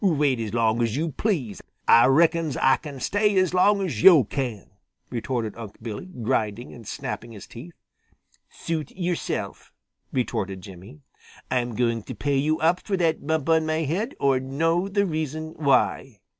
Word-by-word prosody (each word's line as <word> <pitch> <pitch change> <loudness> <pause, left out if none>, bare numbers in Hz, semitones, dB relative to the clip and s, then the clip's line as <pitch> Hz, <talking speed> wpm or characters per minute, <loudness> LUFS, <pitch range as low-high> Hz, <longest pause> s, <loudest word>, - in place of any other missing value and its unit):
"Wait 150 - +2
as 110 -2 -3
long 115 0 +1
as 115 +1 0
yo' 160 +1 -1
please. 140 - -2 0.3
Ah 115 - +7
reckons 160 +1 +3
Ah 135 0 +4
can 145 -3 -9
stay 205 +7 +1
as 185 -1 +2
long 200 +2 +4
as 125 - -3
yo' 170 -8 +8
can," 115 -3 -4 0.4
retorted 120 -3 -3
Unc' 110 -3 -9
Billy, 110 - -6 0.2
grinding 110 +1 -1
and 115 -4 -12
snapping 115 0 -5
his 105 - -10
teeth. 155 +9 -11 0.7
"Suit 160 -4 -4
yourself," 175 -2 -4 0.4
retorted 110 -6 -2
Jimmy. 95 - -12 0.5
"I'm 120 -2 0
going 115 0 0
to - - -8
pay 140 -1 0
you 155 +3 +1
up 170 +3 +3
for 195 - -2
that 165 -4 0
bump 160 -2 0
on 160 -1 +3
my 155 +1 0
head 190 - -2
or 135 -2 +3
know 165 +7 0
the 200 +1 +1
reason 155 -2 -3
why." 135 -5 +1
140 Hz, 165 wpm, -24 LUFS, 115-165 Hz, 0.7 s, yo